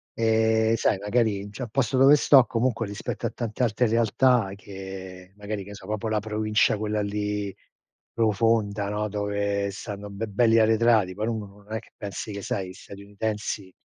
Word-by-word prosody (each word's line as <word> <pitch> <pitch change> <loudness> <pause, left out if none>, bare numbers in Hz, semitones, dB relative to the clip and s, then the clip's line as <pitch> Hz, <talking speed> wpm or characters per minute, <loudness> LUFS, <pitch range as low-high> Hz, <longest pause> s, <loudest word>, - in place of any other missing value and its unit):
Ehm, 110 0 +3
sai, 110 - +1
magari 105 0 0
n 105 - -10
c'è 105 - -9
un 120 - -6
posto 130 +1 0
dove 135 +2 +8
sto 135 -3 +6
comunque 115 -1 -1
rispetto 100 0 -4
a - - -3
tante 115 0 -5
altre 120 +1 +2
realtà 115 0 +3
che 95 -2 -9
magari 105 0 -4
che 100 - -13
ne 105 - -8
so, 95 - -12
proprio 110 +1 -3
la 110 -1 +1
provincia 110 0 +1
quella 105 0 -1
lì 105 -1 -2 0.6
profonda, 110 -2 +1
no, 105 +1 -1
dove 100 0 -1
stanno 105 0 -7
be 100 +3 -4
belli 115 +2 +3
arretrati, 110 -3 +3
poi 105 +4 -3
uno 110 -2 -3
no 100 0 -16
non 105 +2 -10
è - - 0
che 115 - -20
pensi 100 +1 -6
che, 100 0 -5
sai, 95 -1 -3
gli - - -9
statunitensi 100 0 -5
105 Hz, 185 wpm, -25 LUFS, 100-115 Hz, 0.6 s, dove